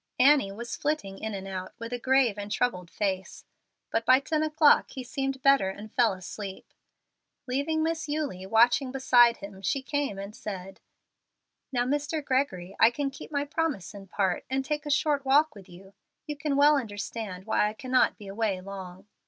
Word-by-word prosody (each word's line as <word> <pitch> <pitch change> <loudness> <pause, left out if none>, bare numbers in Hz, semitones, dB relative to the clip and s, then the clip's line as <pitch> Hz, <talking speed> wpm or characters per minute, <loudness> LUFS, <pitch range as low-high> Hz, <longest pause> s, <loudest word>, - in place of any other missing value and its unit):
Annie 270 -5 +5
was 235 +4 -6
flitting 240 -11 -2
in 220 -1 -4
and 195 0 -6
out 185 -1 -6
with 230 +1 -6
a 245 - -2
grave 260 -3 +3
and 205 0 -7
troubled 180 -8 -1
face. 190 -1 -3 0.5
But 225 - +1
by 255 +2 +6
ten 305 +3 -1
o'clock 310 -1 +4
he 260 - -7
seemed 270 +1 -3
better 275 -8 +5
and 205 +3 -9
fell 235 -5 +3
asleep. 190 +1 -8 0.7
Leaving 285 +5 0
Miss 320 -1 -2
Eulie 285 -12 -3
watching 240 +5 +4
beside 245 -3 +5
him, 195 -1 -10
she 265 +8 -1
came 285 -7 -2
and 200 +2 -7
said, 195 -2 -7 0.9
"Now, 245 -2 +1
Mr. 290 +3 -1
Gregory, 195 -10 -1
I 225 - +7
can 275 +3 -3
keep 270 - -11
my 285 -1 0
promise 290 - -2
in 200 -1 -10
part, 190 -1 0
and 265 0 -1
take 300 +1 -3
a - - -3
short 290 -1 +2
walk 290 +3 +4
with 200 -3 -14
you. 190 +3 -14 0.3
You 300 -1 -4
can 285 0 -2
well 290 +1 +6
understand 205 -4 -5
why 210 -1 +2
I - - -7
cannot 255 +3 +1
be 205 - -11
away 200 -1 -1
long." 190 0 -9
240 Hz, 185 wpm, -28 LUFS, 195-280 Hz, 0.9 s, I